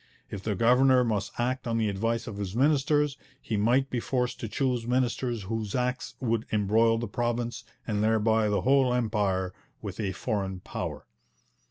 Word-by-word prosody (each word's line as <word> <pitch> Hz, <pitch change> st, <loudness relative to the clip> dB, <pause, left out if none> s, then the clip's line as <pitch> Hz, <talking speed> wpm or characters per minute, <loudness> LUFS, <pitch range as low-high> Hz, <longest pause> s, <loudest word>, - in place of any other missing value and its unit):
If 100 Hz, -, -5 dB
the 105 Hz, 0 st, -2 dB
governor 125 Hz, +4 st, +5 dB
must 110 Hz, -4 st, -1 dB
act 125 Hz, +1 st, -1 dB
on 115 Hz, 0 st, 0 dB
the 110 Hz, -1 st, +1 dB
advice 115 Hz, +3 st, -1 dB
of 110 Hz, -4 st, -7 dB
his 100 Hz, -1 st, -4 dB
ministers, 145 Hz, +1 st, +2 dB, 0.2 s
he 110 Hz, -, -3 dB
might 120 Hz, +6 st, +2 dB
be 125 Hz, -, 0 dB
forced 125 Hz, +1 st, -1 dB
to 115 Hz, -, -4 dB
choose 125 Hz, 0 st, -1 dB
ministers 120 Hz, -2 st, 0 dB
whose 110 Hz, 0 st, -3 dB
acts 125 Hz, 0 st, -2 dB
would 115 Hz, -3 st, -1 dB
embroil 110 Hz, +2 st, +3 dB
the 115 Hz, +1 st, -3 dB
province, 120 Hz, +2 st, -2 dB, 0.2 s
and 105 Hz, -2 st, -1 dB
thereby 110 Hz, 0 st, +3 dB
the 105 Hz, -, +1 dB
whole 130 Hz, -2 st, +3 dB
Empire, 100 Hz, -6 st, 0 dB, 0.3 s
with 100 Hz, -2 st, -7 dB
a 100 Hz, -3 st, -1 dB
foreign 95 Hz, -2 st, -2 dB
power. -, -, -5 dB
115 Hz, 170 wpm, -28 LUFS, 105-125 Hz, 0.3 s, governor